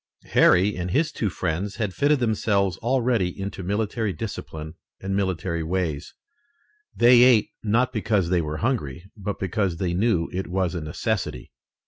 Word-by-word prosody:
Harry 100 Hz, +3 st, +5 dB
and 90 Hz, 0 st, -3 dB
his 155 Hz, -, +1 dB
two 110 Hz, -, -2 dB
friends 95 Hz, +2 st, -3 dB
had 105 Hz, -5 st, -2 dB
fitted 145 Hz, +5 st, +3 dB
themselves 105 Hz, -5 st, +1 dB
already 120 Hz, -7 st, 0 dB
into 100 Hz, 0 st, -5 dB
military 105 Hz, +3 st, -1 dB
discipline 80 Hz, -7 st, -6 dB, 0.3 s
and 95 Hz, 0 st, -3 dB
military 90 Hz, -3 st, -1 dB
ways. 80 Hz, -3 st, -3 dB, 0.8 s
They 120 Hz, 0 st, +6 dB
ate, 125 Hz, -4 st, +5 dB
not 120 Hz, +4 st, +1 dB
because 105 Hz, -5 st, 0 dB
they 90 Hz, -1 st, +2 dB
were 75 Hz, -1 st, -4 dB
hungry, 95 Hz, -, -3 dB
but 100 Hz, -1 st, -4 dB
because 95 Hz, -2 st, -1 dB
they 85 Hz, 0 st, -1 dB
knew 95 Hz, -3 st, +1 dB
it 95 Hz, +1 st, -3 dB
was 90 Hz, -1 st, -1 dB
a 85 Hz, -, -3 dB
necessity. 75 Hz, -, -3 dB
95 Hz, 150 wpm, -24 LUFS, 90-110 Hz, 0.8 s, They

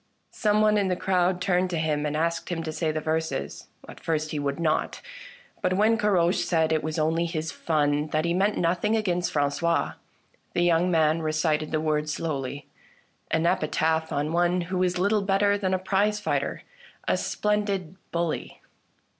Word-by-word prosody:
Some 210 Hz, -1 st, +2 dB
one 215 Hz, -1 st, +4 dB
in 200 Hz, -, +1 dB
the 180 Hz, -, +1 dB
crowd 180 Hz, 0 st, +1 dB
turned 180 Hz, 0 st, +1 dB
to 175 Hz, -, -2 dB
him 150 Hz, -2 st, 0 dB
and 150 Hz, +1 st, -2 dB
asked 170 Hz, +3 st, -1 dB
him 165 Hz, -2 st, -2 dB
to 160 Hz, -, -3 dB
say 155 Hz, 0 st, -1 dB
the 155 Hz, -, -2 dB
verses. 160 Hz, -3 st, -3 dB, 0.2 s
At -, -, -11 dB
first 155 Hz, -1 st, -2 dB
he 150 Hz, -, -2 dB
would 140 Hz, +1 st, -2 dB
not; 155 Hz, -2 st, 0 dB, 0.6 s
but 185 Hz, -, +1 dB
when 215 Hz, +3 st, +4 dB
Caroche 190 Hz, -5 st, +2 dB
said 160 Hz, -2 st, +1 dB
that 160 Hz, -, +3 dB
it 155 Hz, -, -6 dB
was 155 Hz, +1 st, -3 dB
only 160 Hz, +2 st, +1 dB
his 160 Hz, -1 st, -3 dB
fun, 150 Hz, -2 st, 0 dB
that 155 Hz, +1 st, 0 dB
he 170 Hz, -, +1 dB
meant 200 Hz, +3 st, +1 dB
nothing 180 Hz, +5 st, +1 dB
against 180 Hz, -5 st, 0 dB
Frangois, 145 Hz, +3 st, 0 dB, 0.6 s
the 175 Hz, -, +2 dB
young 175 Hz, +1 st, +3 dB
man 160 Hz, -1 st, +2 dB
recited 155 Hz, 0 st, 0 dB
the 155 Hz, -, 0 dB
words 155 Hz, -1 st, 0 dB
slowly 140 Hz, -3 st, -4 dB, 0.3 s
— -, -, -39 dB
an 160 Hz, +1 st, +1 dB
epitaph 160 Hz, 0 st, +1 dB
on 145 Hz, +3 st, -1 dB
one 175 Hz, +1 st, +2 dB
who 180 Hz, +2 st, -3 dB
was 180 Hz, 0 st, +1 dB
little 200 Hz, +3 st, +2 dB
better 200 Hz, +1 st, +2 dB
than 195 Hz, -2 st, -1 dB
a 185 Hz, -, +2 dB
prize 200 Hz, +3 st, +1 dB
fighter, 210 Hz, -, -2 dB, 0.4 s
a -, -, +3 dB
splendid 200 Hz, -4 st, -1 dB, 0.2 s
bully. 170 Hz, -1 st, -2 dB
170 Hz, 185 wpm, -26 LUFS, 155-185 Hz, 0.6 s, one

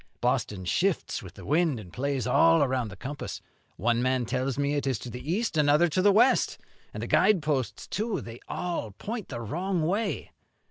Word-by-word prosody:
Boston 95 Hz, -3 st, -1 dB
shifts 85 Hz, -, 0 dB
with -, -, -11 dB
the -, -, -11 dB
wind, 155 Hz, -3 st, +2 dB
and 90 Hz, -5 st, -11 dB
plays 135 Hz, -2 st, -1 dB
all 165 Hz, +5 st, +5 dB
around 130 Hz, -3 st, 0 dB
the 100 Hz, -, -9 dB
compass. 140 Hz, +8 st, -6 dB, 0.4 s
One 120 Hz, +4 st, +1 dB
man 130 Hz, -1 st, +1 dB
tells 130 Hz, +2 st, -1 dB
me 145 Hz, 0 st, +1 dB
it 145 Hz, -1 st, -1 dB
is 130 Hz, -4 st, +1 dB
to 120 Hz, +3 st, -8 dB
the 125 Hz, +6 st, -5 dB
east, 215 Hz, -2 st, 0 dB
another 150 Hz, +3 st, +5 dB
to 175 Hz, +4 st, +1 dB
the 205 Hz, +2 st, +6 dB
west; 240 Hz, +6 st, +4 dB, 0.3 s
and -, -, -6 dB
the -, -, -3 dB
guide 200 Hz, -7 st, +4 dB
posts, 135 Hz, -4 st, -1 dB
too, 215 Hz, +2 st, -2 dB
they 115 Hz, +1 st, -9 dB
all 170 Hz, -, -3 dB
point 215 Hz, -, -5 dB
the 120 Hz, -, -5 dB
wrong 170 Hz, -, -1 dB
way.' 200 Hz, +7 st, -1 dB
145 Hz, 195 wpm, -28 LUFS, 125-175 Hz, 0.4 s, the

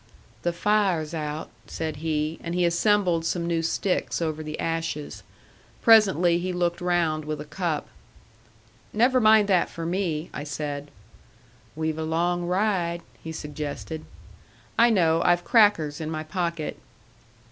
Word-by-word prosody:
"The 175 Hz, -, 0 dB
fire's 180 Hz, -4 st, +1 dB
out," 150 Hz, -1 st, -4 dB, 0.2 s
said 160 Hz, -2 st, -4 dB
he; 155 Hz, 0 st, -2 dB
and 170 Hz, 0 st, -3 dB
he 180 Hz, -1 st, +2 dB
assembled 175 Hz, -1 st, +2 dB
some 170 Hz, +1 st, -1 dB
new 170 Hz, -1 st, 0 dB
sticks 180 Hz, +3 st, -1 dB
over 155 Hz, -2 st, -2 dB
the 155 Hz, 0 st, -6 dB
ashes. 165 Hz, -2 st, -3 dB, 0.6 s
Presently 190 Hz, -6 st, +5 dB
he 185 Hz, +1 st, -2 dB
looked 175 Hz, -1 st, -1 dB
round 170 Hz, -3 st, +1 dB
with 155 Hz, 0 st, -4 dB
a 150 Hz, -, -6 dB
cup. 155 Hz, 0 st, -2 dB, 1.1 s
"Never 250 Hz, +4 st, +3 dB
mind 215 Hz, -1 st, +6 dB
that 180 Hz, -3 st, +3 dB
for 165 Hz, -, -6 dB
me," 170 Hz, -3 st, -2 dB
I 145 Hz, -, -5 dB
said. 145 Hz, -1 st, -5 dB, 0.9 s
"We've 160 Hz, 0 st, -2 dB
a -, -, -1 dB
long 175 Hz, +2 st, 0 dB
ride," 180 Hz, -3 st, 0 dB, 0.2 s
he 160 Hz, -, -5 dB
suggested. 150 Hz, +1 st, -6 dB, 0.7 s
"I 235 Hz, +1 st, +5 dB
know. 165 Hz, -6 st, +3 dB
I've 175 Hz, 0 st, +3 dB
crackers 175 Hz, -10 st, +3 dB
in 155 Hz, -, -3 dB
my 155 Hz, -1 st, -3 dB
pocket." 170 Hz, -1 st, -3 dB
170 Hz, 140 wpm, -25 LUFS, 155-180 Hz, 1.1 s, mind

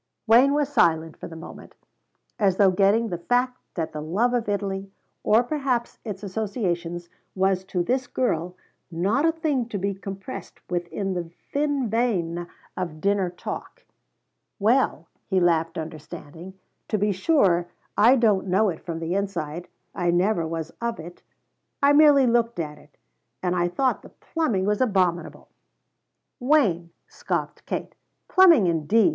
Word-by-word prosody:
Wayne 250 Hz, +5 st, +5 dB
was 290 Hz, -1 st, +1 dB
silent 160 Hz, -, +2 dB
for -, -, -8 dB
the 165 Hz, -, -10 dB
moment, 160 Hz, -, -11 dB, 0.6 s
as 195 Hz, -3 st, +2 dB
though 195 Hz, -2 st, +5 dB
getting 205 Hz, +5 st, +3 dB
the 175 Hz, -3 st, -4 dB
fact 250 Hz, +6 st, 0 dB, 0.2 s
that 165 Hz, -3 st, -3 dB
the 150 Hz, -, -5 dB
love 205 Hz, +11 st, 0 dB
of 235 Hz, -3 st, -1 dB
Italy, 195 Hz, -1 st, -2 dB, 0.3 s
or 225 Hz, +3 st, +4 dB
perhaps 255 Hz, -3 st, -2 dB
its 210 Hz, -3 st, -6 dB
associations, 180 Hz, -5 st, -3 dB, 0.3 s
was 190 Hz, 0 st, +1 dB
to 180 Hz, -2 st, -1 dB
this 255 Hz, +6 st, -1 dB
girl 180 Hz, -7 st, -1 dB, 0.3 s
not 195 Hz, -, +1 dB
a -, -, +4 dB
thing 295 Hz, -7 st, -1 dB
to 210 Hz, -, -3 dB
be 200 Hz, +1 st, -1 dB
compressed 195 Hz, +4 st, -8 dB
within 180 Hz, +3 st, -2 dB
the 175 Hz, -2 st, -4 dB, 0.2 s
thin 285 Hz, -3 st, 0 dB
vein 180 Hz, -7 st, -1 dB, 0.3 s
of 170 Hz, -4 st, -4 dB
dinner 200 Hz, 0 st, +1 dB
talk. 340 Hz, -, -8 dB, 0.7 s
"Well," 215 Hz, -6 st, +2 dB, 0.2 s
he 190 Hz, -2 st, +2 dB
laughed 165 Hz, -1 st, +1 dB
understanding, 160 Hz, +2 st, -8 dB, 0.3 s
"to 215 Hz, -, 0 dB
be 205 Hz, +1 st, +1 dB
sure 190 Hz, -, +2 dB, 0.3 s
I 235 Hz, +5 st, +6 dB
don't 215 Hz, -6 st, +2 dB
know 195 Hz, +3 st, +3 dB
it 160 Hz, -, -6 dB
from 165 Hz, -1 st, -5 dB
the 165 Hz, +2 st, -2 dB
inside. 175 Hz, -4 st, -3 dB, 0.3 s
I 175 Hz, -2 st, -1 dB
never 175 Hz, -1 st, +2 dB
was 165 Hz, 0 st, -4 dB
of 235 Hz, 0 st, -2 dB
it; 170 Hz, +2 st, -10 dB, 0.6 s
I 285 Hz, +1 st, +6 dB
merely 290 Hz, -2 st, +6 dB
looked 235 Hz, -2 st, +1 dB
at 150 Hz, -2 st, -4 dB
it. 145 Hz, -, -22 dB, 0.5 s
And 180 Hz, 0 st, +1 dB
I 175 Hz, -1 st, +2 dB
thought 255 Hz, +9 st, 0 dB
the -, -, -14 dB
plumbing 235 Hz, -, -2 dB
was 210 Hz, +2 st, 0 dB
abominable." 185 Hz, -7 st, 0 dB, 0.9 s
"Wayne," 235 Hz, -, +2 dB, 0.2 s
scoffed -, -, -4 dB
Kate, -, -, -4 dB, 0.3 s
"plumbing 345 Hz, -, +6 dB
indeed! 175 Hz, -, +3 dB
195 Hz, 150 wpm, -24 LUFS, 175-240 Hz, 0.9 s, I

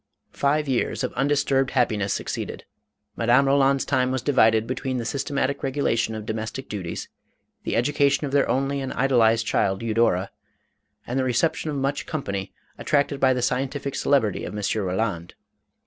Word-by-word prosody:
Five 150 Hz, +2 st, +1 dB
years 130 Hz, -3 st, -1 dB
of -, -, -2 dB
undisturbed 135 Hz, -1 st, +1 dB
happiness 110 Hz, -7 st, +1 dB
succeeded. -, -, -4 dB, 0.5 s
Madame 120 Hz, +4 st, +3 dB
Roland's 135 Hz, 0 st, +3 dB
time 130 Hz, -2 st, +1 dB
was 130 Hz, -2 st, -2 dB
divided 115 Hz, -6 st, +4 dB
between 130 Hz, +1 st, -3 dB
the 120 Hz, -, -2 dB
sys 135 Hz, +4 st, -2 dB
tematic 140 Hz, -1 st, -1 dB
regulation 125 Hz, -5 st, 0 dB
of 110 Hz, -1 st, -6 dB
domestic 110 Hz, +4 st, -4 dB
duties, 95 Hz, -5 st, -5 dB, 0.6 s
the -, -, -1 dB
education 140 Hz, +4 st, +2 dB
of 140 Hz, -, -4 dB
their 140 Hz, 0 st, +2 dB
only 135 Hz, +2 st, 0 dB
and 135 Hz, -, -4 dB
idolized 115 Hz, -4 st, +3 dB
child 95 Hz, -1 st, 0 dB
Eudora, 110 Hz, -5 st, +1 dB, 0.7 s
and 125 Hz, +3 st, -2 dB
the -, -, +1 dB
reception 130 Hz, +5 st, 0 dB
of 150 Hz, -, -3 dB
much 140 Hz, +1 st, -2 dB
company, 100 Hz, -, -4 dB, 0.3 s
attracted 145 Hz, -1 st, +1 dB
by 130 Hz, -1 st, +4 dB
the 125 Hz, -1 st, 0 dB
scientific 135 Hz, +2 st, -1 dB
celebrity 120 Hz, -9 st, +1 dB
of 105 Hz, -, -5 dB
M. 105 Hz, -, -4 dB, 0.2 s
Roland. 90 Hz, -2 st, -2 dB
130 Hz, 160 wpm, -24 LUFS, 110-140 Hz, 0.7 s, divided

